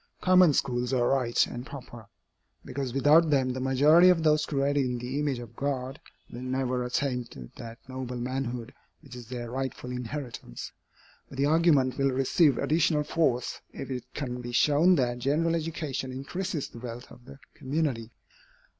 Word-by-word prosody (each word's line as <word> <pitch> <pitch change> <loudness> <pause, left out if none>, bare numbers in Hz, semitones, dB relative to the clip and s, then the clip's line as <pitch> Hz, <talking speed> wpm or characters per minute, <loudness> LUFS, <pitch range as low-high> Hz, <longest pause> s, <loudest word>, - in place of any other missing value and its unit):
Common 185 -3 +6
schools 125 -1 0
are 120 -2 +2
right 125 -3 +2
and 120 - -7
proper, 120 -5 -10 0.6
because 130 -1 -4
without 150 +5 +5
them 135 -3 +2
the 130 - -4
majority 145 +7 +5
of 170 -3 +3
those 155 -1 +3
created 140 0 +1
in 125 -1 -2
the 125 +4 -4
image 145 -3 0
of 120 -3 -10
God 135 0 -3 0.3
will 120 - -7
never 130 -1 -1
attain 125 0 -1
to 65 - -11
that 115 0 -8
noble 130 -1 -5
manhood 125 -1 -4 0.3
which 135 -3 -12
is 120 -2 -10
their 120 -1 -6
rightful 130 -1 -4
inheritance. 125 - -6 0.6
But 135 - -11
the 140 - +2
argument 145 -4 +3
will 135 0 +3
receive 135 +2 +3
additional 155 -1 +2
force, 135 -6 0
if 135 - -7
it 125 -2 -4
can 125 -3 -4
be 120 0 -7
shown 155 +8 +4
that 125 -4 0
general 155 +6 +1
education 155 -5 -3
increases 155 +5 -4
the 115 - -12
wealth 120 0 -8
of 120 0 -15
the 135 - -12 0.2
community. 130 -5 -2
130 Hz, 165 wpm, -28 LUFS, 125-150 Hz, 0.6 s, Common